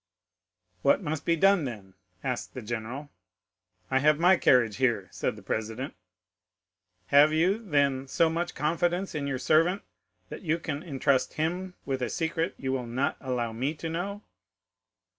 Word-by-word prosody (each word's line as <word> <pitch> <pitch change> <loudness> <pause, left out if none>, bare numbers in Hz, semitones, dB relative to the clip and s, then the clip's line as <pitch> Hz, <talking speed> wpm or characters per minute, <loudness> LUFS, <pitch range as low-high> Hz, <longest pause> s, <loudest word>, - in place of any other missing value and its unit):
"What 140 +8 +3
must 150 -1 -3
be 170 - +3
done 195 -1 +4
then?" 105 -6 -7 0.3
asked 125 -2 -3
the 130 - -6
general.—"I 95 -4 -6
have 150 +2 +4
my 180 +3 +6
carriage 120 - +3
here," 120 -7 +1
said - - -2
the - - -13
president. 110 +5 -3 1.2
"'"Have 145 +2 +7
you, 175 +7 +2
then, 140 -7 +1
so 165 +5 +3
much 170 +2 -2
confidence 175 +5 0
in 145 -2 -2
your 135 -2 -1
servant 165 +8 +2 0.5
that - - -7
you 165 -2 0
can 150 -3 -4
intrust 140 -5 0
him 180 +4 -2
with 135 -2 -2
a 125 - -1
secret 165 +1 -1
you 130 -1 -3
will 130 -2 -2
not 125 +4 0
allow 125 -4 -2
me 135 +7 -2
to 165 +2 -5
know?" 200 +5 -4
140 Hz, 155 wpm, -28 LUFS, 125-165 Hz, 1.2 s, Have